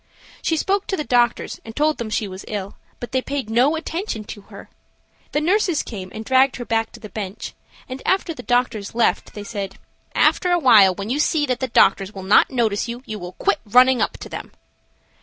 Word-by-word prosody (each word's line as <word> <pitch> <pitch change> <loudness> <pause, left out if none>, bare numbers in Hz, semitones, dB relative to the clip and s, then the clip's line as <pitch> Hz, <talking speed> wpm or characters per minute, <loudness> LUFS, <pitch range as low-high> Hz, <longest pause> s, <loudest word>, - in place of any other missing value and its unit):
She 325 - 0
spoke 390 +4 0
to 385 - -1
the 300 - -2
doctors 240 -3 +1
and 225 0 -10
told 305 +1 +1
them 235 -2 -4
she 215 -1 -1
was 190 0 -8
ill, 200 -2 -5 0.2
but 240 - -7
they 260 -1 +1
paid 270 -4 -4
no 255 +7 +3
attention 325 - -4
to 205 - -9
her. - - -11 0.6
The 295 - +1
nurses 355 0 +1
came 190 -5 -8
and 220 +1 -7
dragged 260 +1 +4
her 245 - -6
back 225 -1 0
to 235 - -11
the 220 - -9
bench, 200 -2 -6 0.3
and 260 +1 -7
after 375 -3 +1
the - - -9
doctors 245 -4 -1
left 235 - +1
they 205 - -6
said, 200 -2 -5 0.4
"After 360 - +3
awhile, 225 - +6
when 200 +4 -5
you 280 - 0
see 300 0 +2
that 255 -3 -1
the 260 - -1
doctors 195 -3 +3
will 190 - -7
not 190 +2 +5
notice 230 -5 0
you, 240 +2 -6
you 215 -1 -6
will 180 0 -8
quit - - 0
running 250 +3 +5
up - - 0
to - - -7
them." - - -8
240 Hz, 215 wpm, -21 LUFS, 210-285 Hz, 0.6 s, awhile